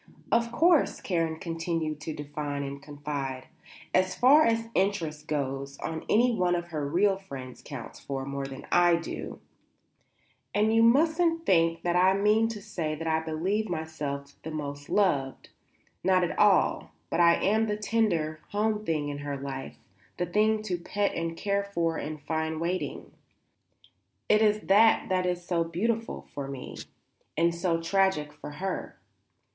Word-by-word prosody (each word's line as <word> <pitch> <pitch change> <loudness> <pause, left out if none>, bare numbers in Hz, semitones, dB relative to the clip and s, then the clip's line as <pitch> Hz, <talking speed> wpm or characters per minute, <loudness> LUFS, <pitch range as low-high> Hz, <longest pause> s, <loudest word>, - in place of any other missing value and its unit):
"Of 235 0 +2
course," 325 +5 +3
Karen 165 -3 -1
continued 165 -2 -3
to 160 - -4
define 145 -1 -4
and 140 0 -6
confide, 140 -2 -5 0.5
"as 185 0 +2
far 285 +5 +6
as 230 0 +1
interest 165 -6 -1
goes 140 -1 -3 0.3
any 240 +3 +4
one 180 -4 +2
of 175 0 -4
her 150 -4 -3
real 190 +5 +3
friends 135 -9 -9
counts 140 -6 -8
for 135 -1 -4
more 140 0 -4
than 135 -1 -9
I 175 -1 +5
do, 170 - -5 1.2
and 215 +2 +3
you 225 - +5
mustn't 330 +7 +3
think 165 -2 +3
that 175 0 +1
I 185 +2 +5
mean 210 +3 +3
to 215 -3 -6
say 165 -7 -3
that 165 +2 -6
I 160 0 +2
believe 175 +7 -1
myself 150 -4 -4
the 160 - -6
most 145 -2 -5
loved; 145 -10 +1 0.5
not 185 -1 +4
at 175 - -1
all. 205 -2 +3 0.2
But - - 0
I 170 -1 +6
am 220 +3 +2
the 210 -1 -1
tender, 200 -8 0
home 210 +1 0
thing 155 -6 -1
in 145 0 -5
her 145 -1 -4
life; 135 -1 -6 0.4
the 180 - 0
thing 215 +4 +2
to 180 -5 -2
pet 200 +4 -1
and 165 0 -3
care 200 -1 0
for 170 -5 -1
and 155 +1 -5
find 160 +1 -2
waiting. 175 +3 -3 1.2
It 215 0 +4
is 215 -1 +3
that 220 +3 +4
that 185 -1 +1
is 175 -1 -2
so 170 -2 +1
beautiful 220 +7 -2
for 140 -1 -4
me 135 -2 -7 0.6
and 170 +1 +3
so 170 -1 0
tragic 165 -4 +1
for 150 0 -9
her." 185 +5 -4
170 Hz, 160 wpm, -28 LUFS, 150-205 Hz, 1.2 s, far